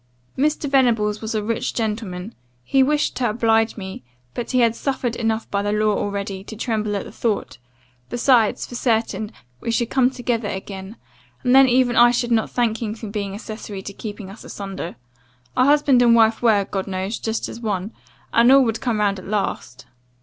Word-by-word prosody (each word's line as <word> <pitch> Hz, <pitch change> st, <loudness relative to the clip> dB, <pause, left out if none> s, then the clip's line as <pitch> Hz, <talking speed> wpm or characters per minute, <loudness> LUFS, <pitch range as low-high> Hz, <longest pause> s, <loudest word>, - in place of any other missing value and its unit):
"'Mr. 295 Hz, +2 st, 0 dB
Venables 230 Hz, -6 st, +2 dB
was 220 Hz, 0 st, -3 dB
a 215 Hz, -, 0 dB
rich 225 Hz, +1 st, -2 dB
gentleman; 210 Hz, -3 st, -3 dB, 0.3 s
he 270 Hz, -, +2 dB
wished 295 Hz, +2 st, +1 dB
to 245 Hz, -3 st, 0 dB
oblige 225 Hz, 0 st, +2 dB
me, 190 Hz, -7 st, -7 dB, 0.3 s
but 240 Hz, -, -4 dB
he 255 Hz, -1 st, +2 dB
had 230 Hz, -1 st, +3 dB
suffered 255 Hz, -3 st, -2 dB
enough 225 Hz, -1 st, -1 dB
by 200 Hz, -, +1 dB
the 205 Hz, 0 st, -1 dB
law 210 Hz, 0 st, +2 dB
already, 200 Hz, -1 st, -3 dB
to 220 Hz, -, -9 dB
tremble 215 Hz, -2 st, -1 dB
at 200 Hz, -, -2 dB
the -, -, -10 dB
thought; 215 Hz, -, -2 dB, 0.5 s
besides, 240 Hz, -3 st, +3 dB
for -, -, -12 dB
certain, 225 Hz, -3 st, 0 dB, 0.3 s
we -, -, -5 dB
should 230 Hz, 0 st, 0 dB
come 255 Hz, -2 st, +4 dB
together 245 Hz, -4 st, -2 dB
again, 190 Hz, +1 st, -6 dB, 0.5 s
and 250 Hz, -1 st, +3 dB
then 270 Hz, 0 st, +7 dB
even 245 Hz, -1 st, +3 dB
I 240 Hz, 0 st, +7 dB
should 240 Hz, 0 st, 0 dB
not 225 Hz, -1 st, +2 dB
thank 235 Hz, -2 st, 0 dB
him 215 Hz, -2 st, -3 dB
for 220 Hz, -2 st, -7 dB
being 200 Hz, -2 st, -4 dB
accessary 210 Hz, -2 st, -7 dB
to 200 Hz, -, -7 dB
keeping 205 Hz, -2 st, -7 dB
us 205 Hz, -, -12 dB
asunder. 195 Hz, -3 st, -6 dB, 0.6 s
A 255 Hz, -, +4 dB
husband 285 Hz, -3 st, +4 dB
and 235 Hz, -1 st, +6 dB
wife 225 Hz, -1 st, +4 dB
were, 215 Hz, -4 st, +3 dB
God 195 Hz, 0 st, -4 dB
knows, 190 Hz, +3 st, -3 dB
just 220 Hz, 0 st, -2 dB
as -, -, -8 dB
one, 205 Hz, -2 st, -3 dB, 0.4 s
and 235 Hz, +2 st, +6 dB
all 270 Hz, 0 st, +7 dB
would 225 Hz, -2 st, -1 dB
come 240 Hz, -5 st, 0 dB
round 200 Hz, -2 st, +1 dB
at 185 Hz, -, -11 dB
last. 195 Hz, -, -3 dB
225 Hz, 195 wpm, -22 LUFS, 205-240 Hz, 0.6 s, then